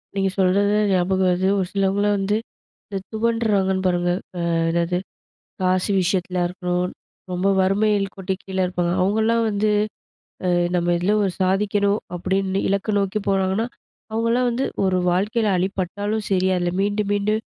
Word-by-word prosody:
நீங்க 195 -1 +1
சொல்றது 200 +2 +3 0.2
ஞாபகம் 185 +1 +2
வருது. 185 +1 +1
ஒரு 190 - +1
சிலவங்களலாம் 200 +1 +1
வந்து 205 +2 +1 0.5
இந்த 200 - -4
துவண்டுறாங்கன்னு 215 -4 +1
பாருங்க. 175 0 +1 0.3
அ - - -3 0.3
எதாவது, 170 +1 0 0.6
காசு 185 +2 +1
விஷயத்திலயா 180 0 0
இருக்கணும், 180 0 -2 0.4
ரொம்ப 180 +2 0
வறுமையில் 195 +1 +1
கோட்டின் 190 0 -2
கீழ 190 -1 -6
இருப்பாங்க. 175 -1 -1
அவங்கலாம் 220 +4 +2
வந்து 210 +1 +1 0.8
அ - - +1 0.3
நம்ம 175 0 0
இதில 195 +4 +1
ஒரு 195 - 0
சாதிக்கணும் 200 +2 +1 0.2
அப்படின்னு 190 +2 0
இலக்க 200 +2 0
நோக்கி 195 +1 0
போறாங்கன்னா, 195 +3 +1 0.5
அவங்களலாம் 230 +2 +1
வந்து 245 +3 -1 0.2
ஒரு 185 -1 +2
வாழ்க்கையில 210 +4 +1
அடிபட்டாலும் 200 +3 -2
சரி, 190 0 +2
அதில 175 0 -1
மீண்டு 205 +1 +1
மீண்டு 205 +1 +1
195 Hz, 135 wpm, -22 LUFS, 185-205 Hz, 0.8 s, சொல்றது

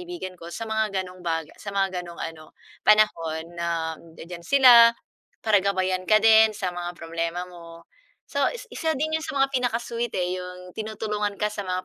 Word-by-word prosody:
kaibigan 350 - -7
ko 170 -1 -10
sa 225 - -5
mga 220 -3 0
gano'ng 180 0 -12
baga 165 -2 -2
sa - - -9
mga 195 -2 -1
gano'ng 170 -1 -10
ano 160 -1 -8 0.2
panahon 165 -7 +3
na 170 -1 -2
nandiya-diyan 170 +1 -11
sila 235 +1 +7 0.5
para 210 -2 +4
gabayan 185 -1 -1
ka 215 - +6
din 220 -1 +6
sa 185 -4 -2
mga 175 0 -5
problema 165 +2 -3
mo. 170 -2 -13 0.4
So, - - -3
is - - -7
isa 320 -3 -1
din 310 +3 -2
'yun 320 - +1
sa 310 -3 -5
mga 275 0 +2
pinaka-sweet 240 -2 -1
eh, 180 0 -1
'yung 180 0 -9
tinutulungan 210 -1 -3
ka 210 +1 -1
sa 210 - -5
mga 185 0 -2
185 Hz, 180 wpm, -25 LUFS, 175-220 Hz, 0.5 s, sila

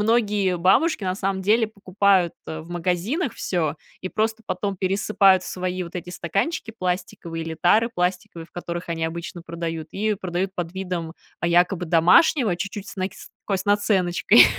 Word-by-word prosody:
многие 210 -5 +2
бабушки, 270 - +3
на 185 -1 -1
самом 195 -1 -1
деле, 220 +3 +3
покупают, 200 -3 +2
э, 160 0 -5
в 165 +2 -13
магазинах 185 - -1
всё, 165 -5 -1 0.3
и 185 - -4
просто 220 +2 -1
потом 200 -2 -2
пересыпают 195 0 +3
в - - -9
свои 185 0 -3
вот 175 +1 -7
эти 180 0 -6
стаканчики 200 - -2
пластиковые 180 -4 -3
или 160 0 -5
тары 220 +6 +4
пластиковые, 180 -2 -2
в - - -34
которых 175 0 -5
они 165 -1 -2
обычно 170 +1 -5
продают, 165 -2 -5
и 215 +1 0
продают 185 0 -3
под 175 -1 -4
видом, 180 -4 -4 0.3
а, 170 - +1
якобы 175 +1 +3
домашнего, 180 - +5
чуть-чуть 200 +2 -5
с - - -9
нак 185 +1 -2
с - - -12 0.2
такой 195 - 0
наценочкой. 190 - +5
185 Hz, 170 wpm, -23 LUFS, 170-205 Hz, 0.3 s, домашнего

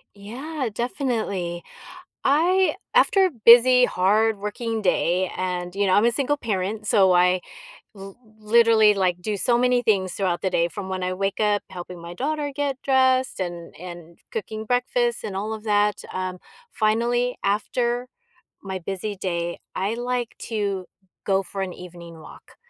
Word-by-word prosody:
Yeah, 255 +7 -5
definitely. 220 - -2 0.6
I 360 +7 +3 0.2
after 385 -1 +5
a - - -1
busy, 250 +2 +8
hardworking 215 +3 0
day, 180 -1 +1
and 180 -1 -3
you 200 0 +1
know, 185 - +3
I'm 210 - +4
a 235 - +3
single 290 +2 0
parent, 210 -2 -3
so 190 -3 +4
I 180 +1 +4 0.5
l 195 -1 -11 0.2
literally, 220 -1 +5
like, 180 -2 0
do 205 +3 -2
so 240 +4 +2
many 250 0 +2
things 190 -5 +1
throughout 185 -3 -1
the 190 - 0
day 170 -1 +1
from 190 +2 -7
when 185 -1 -3
I 180 0 -1
wake 195 +2 -2
up, 210 -1 +2
helping 180 -1 -9
my 170 +1 -9
daughter 295 - -2
get 280 -2 -2
dressed, 260 -3 +2
and 175 -2 -5
and 175 -1 -10
cooking 220 +1 -5
breakfast, 245 0 0
and 195 - -4
all 210 +3 -3
of 220 0 -7
that, 210 -1 +1
um, 185 0 -4 0.3
finally, 240 +3 +1
after 240 +4 0 0.6
my 190 -1 -5
busy 195 +3 -4
day, 175 -2 -3 0.2
I 195 +3 -1
like 245 0 -3
to 200 -4 -2 0.4
go 195 -1 +2
for 195 +1 -6
an 185 -2 -3
evening 170 -2 -11
walk. 155 - -15
205 Hz, 155 wpm, -23 LUFS, 185-240 Hz, 0.6 s, busy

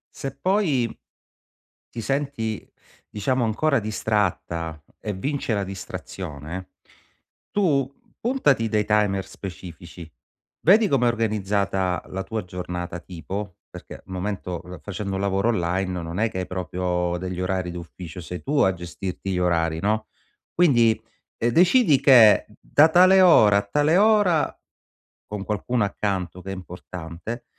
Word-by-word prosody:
Se 135 0 -5
poi 155 - +1 1.0
ti 120 - -7
senti, 115 -3 -3 0.4
diciamo, 125 +4 0
ancora 140 +6 +1
distratta 95 -7 -2 0.2
e 105 - -3
vince 135 +3 -2
la 100 - -1
distrazione, 90 -3 -7 0.8
tu 145 -10 +1 0.3
puntati 145 - +2
dei 105 -1 +1
timer 105 -2 +1
specifici, 90 -3 -10 0.6
vedi 210 +4 +6
come 130 -6 +2
è - - +4
organizzata 100 -4 0
la 95 0 -4
tua 110 -3 -4
giornata 90 -1 -5
tipo, 95 +2 -6
perché - - -10
al - - -19
momento 90 -2 -4
l 90 -2 -10
facendo 100 +2 -4
un 95 - -2
lavoro 100 +2 +1
online 90 -2 -1
non 85 +3 -5
è 110 0 +1
che - - -5
hai 90 - -3
proprio 90 0 -2
degli 90 0 -4
orari 90 -1 -1
d'ufficio, 85 0 -8
sei 90 +1 -7
tu 145 +2 -1
a 95 -1 +4
gestirti 90 +2 -6
gli 90 - -1
orari 85 -2 +1
no? 110 +2 0 0.4
Quindi 120 -10 +4 0.4
decidi 165 - +4
che 120 -6 +7
da 155 +2 +5
tale 185 +3 +6
ora 110 - +7
a 100 - 0
tale 150 +5 +3
ora, 205 -5 +4 0.7
con 105 -2 -6
qualcuno 105 +2 0
accanto 95 -3 -3
che 95 - -7
è - - -3
importante, 90 +4 -8
100 Hz, 135 wpm, -24 LUFS, 90-120 Hz, 1.0 s, che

